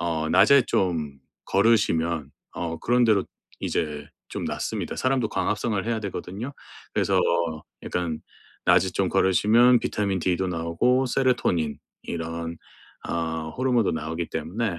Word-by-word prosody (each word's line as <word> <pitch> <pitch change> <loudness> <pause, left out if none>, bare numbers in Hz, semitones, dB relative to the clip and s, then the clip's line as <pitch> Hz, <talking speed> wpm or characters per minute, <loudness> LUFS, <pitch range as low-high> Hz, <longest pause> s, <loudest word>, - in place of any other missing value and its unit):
어 80 -2 -1
낮에 125 +10 +6
좀 80 -7 -1 0.3
걸으시면 85 - +2 0.2
어 85 -1 -4
그런대로 115 -5 +3 0.4
이제 75 -2 -2 0.2
좀 - - -5
낫습니다. - - -3
사람도 130 -4 +1
광합성을 105 +2 -1
해야 115 -1 -1
되거든요. 100 +5 -5 0.4
그래서 - - +2 0.6
약간 85 -3 -2 0.5
낮에 - - +4
좀 - - 0
걸으시면 115 +6 +4
비타민 100 -2 -1
D도 90 +2 0
나오고 90 +10 +1
세로토닌 120 - +1 0.2
이런 85 0 -4 0.5
어 80 -1 -2
호르몬도 125 -5 +2
나오기 80 +2 -4
때문에 105 -3 -2
95 Hz, 285 characters per minute, -25 LUFS, 80-115 Hz, 0.6 s, 낮에